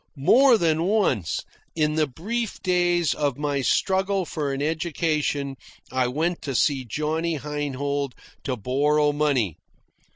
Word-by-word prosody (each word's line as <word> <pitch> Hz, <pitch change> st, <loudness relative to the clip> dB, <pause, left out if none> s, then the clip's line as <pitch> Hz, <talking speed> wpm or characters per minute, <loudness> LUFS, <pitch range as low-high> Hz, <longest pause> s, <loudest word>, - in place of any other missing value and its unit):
More 245 Hz, -, +6 dB
than 165 Hz, -4 st, +1 dB
once, 185 Hz, -, +1 dB, 0.3 s
in 155 Hz, -1 st, +1 dB
the 155 Hz, -1 st, +1 dB
brief 210 Hz, -, -4 dB
days 175 Hz, -3 st, +2 dB
of 145 Hz, -4 st, -1 dB
my 145 Hz, -1 st, -1 dB
struggle 190 Hz, +6 st, +1 dB
for 150 Hz, -4 st, -3 dB
an 135 Hz, -, -3 dB
education, 150 Hz, -3 st, -1 dB, 0.3 s
I 130 Hz, -1 st, +1 dB
went 160 Hz, +7 st, -1 dB
to 135 Hz, -3 st, -4 dB, 0.3 s
Johnny 155 Hz, +6 st, -1 dB
Heinhold 145 Hz, -1 st, -3 dB, 0.3 s
to 130 Hz, -2 st, -2 dB
borrow 145 Hz, +6 st, +2 dB
money. 140 Hz, -, 0 dB
150 Hz, 125 wpm, -24 LUFS, 140-170 Hz, 0.3 s, More